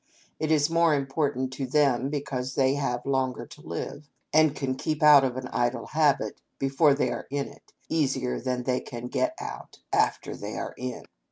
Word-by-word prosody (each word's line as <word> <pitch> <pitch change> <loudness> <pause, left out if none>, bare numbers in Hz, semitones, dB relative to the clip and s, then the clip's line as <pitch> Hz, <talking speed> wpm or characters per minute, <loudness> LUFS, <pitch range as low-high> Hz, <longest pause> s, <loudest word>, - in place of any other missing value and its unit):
It 155 - -1
is 150 -2 +4
more 165 -1 +3
important 135 -2 -1
to 135 0 -3
them 135 -2 +2
because 130 -3 -3
they 135 -1 +3
have 130 -4 -2
longer 130 -2 0
to - - -14
live, 145 0 -6 0.2
and 155 -2 +5
can 135 -2 -1
keep 155 +3 -2
out 150 -2 +9
of 130 -1 -1
an 130 -1 -4
idle 120 -1 0
habit, 150 -2 +1 0.2
before 140 +2 +3
they 125 -3 0
are 120 - -5
in 140 0 -2
it, - - -17 0.2
easier 135 -5 0
than 125 0 -2
they 125 0 +1
can 120 0 -7
get 320 - 0
out - - -7 0.2
after - - +1
they - - -6
are - - -4
in. - - -5
135 Hz, 185 wpm, -27 LUFS, 130-150 Hz, 0.2 s, out